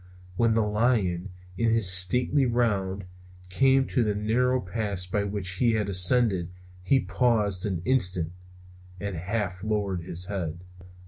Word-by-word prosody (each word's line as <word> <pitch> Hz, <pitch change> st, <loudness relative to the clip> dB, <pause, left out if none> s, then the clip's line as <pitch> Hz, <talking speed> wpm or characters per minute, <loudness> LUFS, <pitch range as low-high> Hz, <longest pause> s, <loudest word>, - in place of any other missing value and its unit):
When 115 Hz, +3 st, +2 dB
the 115 Hz, -, +2 dB
lion, 105 Hz, -4 st, 0 dB, 0.3 s
in 115 Hz, -, +2 dB
his 115 Hz, -3 st, +3 dB
stately 125 Hz, +9 st, +3 dB
round, 100 Hz, -5 st, -1 dB, 0.4 s
came 135 Hz, +6 st, +3 dB
to 125 Hz, -, +1 dB
the 105 Hz, -2 st, -1 dB
narrow 125 Hz, +5 st, +1 dB
pass 100 Hz, -1 st, -3 dB
by 100 Hz, +3 st, -2 dB
which 100 Hz, -2 st, -4 dB
he 115 Hz, +1 st, +2 dB
had 105 Hz, -2 st, -1 dB
ascended 95 Hz, -1 st, +3 dB, 0.3 s
he 130 Hz, +9 st, +2 dB
paused 105 Hz, -6 st, 0 dB
an 90 Hz, -4 st, -4 dB
instant, 90 Hz, -10 st, +1 dB, 0.7 s
and 100 Hz, 0 st, -5 dB
half 95 Hz, +1 st, -4 dB
lowered 100 Hz, -4 st, -2 dB
his 85 Hz, +1 st, -2 dB
head. 90 Hz, -4 st, -5 dB
105 Hz, 140 wpm, -26 LUFS, 90-115 Hz, 0.7 s, his